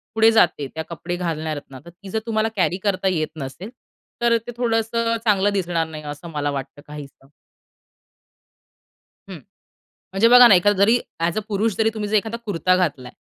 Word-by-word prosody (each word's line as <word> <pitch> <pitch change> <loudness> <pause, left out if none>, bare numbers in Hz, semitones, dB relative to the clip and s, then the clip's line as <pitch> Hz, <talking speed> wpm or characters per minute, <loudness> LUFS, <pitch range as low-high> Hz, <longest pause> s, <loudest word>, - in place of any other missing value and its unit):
पुढे 225 0 +5
जाते, 150 -10 +2
त्या 160 - -3
कपडे 170 +1 -5
घालणाऱ्या 160 -3 -3
आहेत 145 -2 -7
ना, 130 - -10
तर - - -11
ती 185 +3 -14
जर 220 - -1
तुम्हाला 220 -1 0
कॅरी 180 -2 +1
करता 195 -2 0
येत 160 -5 0
नसेल, 150 +8 -7 0.5
तर 235 -1 +3
ते - - -4
थोडंसं 230 -1 0
चांगलं 205 -1 +2
दिसणार 175 -4 -1
नाही, 155 -1 -9
असं 145 +3 -8
मला 145 -2 -2
वाटतं 140 +1 -7
काहीसं. 145 -2 -11 2.0
हं, 190 - -7 0.8
म्हणजे 195 +4 +4
बघा 245 0 +9
ना, 205 - +7
एखादा 205 +3 +3
जरी 230 +4 +4 0.2
ॲज 165 +2 -1
अ - - 0
पुरुष 210 0 0
जरी 220 0 +2
तुम्ही 210 -2 -4
जर 215 - 0
एखादा 225 +2 -3
कुर्ता 185 -2 +1
घातलाय 145 -9 -2
185 Hz, 180 wpm, -21 LUFS, 155-220 Hz, 2.0 s, बघा